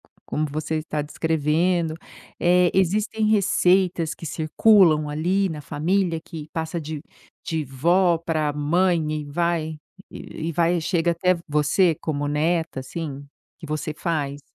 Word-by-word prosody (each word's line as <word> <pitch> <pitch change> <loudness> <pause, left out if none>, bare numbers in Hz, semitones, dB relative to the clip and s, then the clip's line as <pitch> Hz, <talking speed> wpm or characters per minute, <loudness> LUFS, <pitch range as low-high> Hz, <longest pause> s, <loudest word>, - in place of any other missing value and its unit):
co - - -31
como 155 +1 -2
você 155 +2 -3
está 155 -1 -3
descrevendo. 160 +2 0 0.4
Eh, 180 0 +4
existem 210 +4 +1
receitas 185 -5 +2
que 165 - -9
circulam 160 0 +4
ali 180 +6 0
na 155 -3 -5
família 170 +3 0
que 160 -3 -8
passa 160 +1 -3
de 155 -1 -6 0.4
de 160 -2 -2
vó 170 +6 +2
pra 155 -3 -1
mãe 170 +4 +2 0.2
e - - -9
vai 160 +1 -1 0.3
e 160 +1 -6
vai 170 +2 +2
chega 170 +1 +1
até 180 +2 +2
você 150 +3 +2
como 145 -2 -2
neta, 160 0 0
assim. 140 0 -6 0.3
Que 160 - -9
você 155 0 -3
faz? 145 -4 -2
160 Hz, 135 wpm, -23 LUFS, 150-175 Hz, 0.4 s, Eh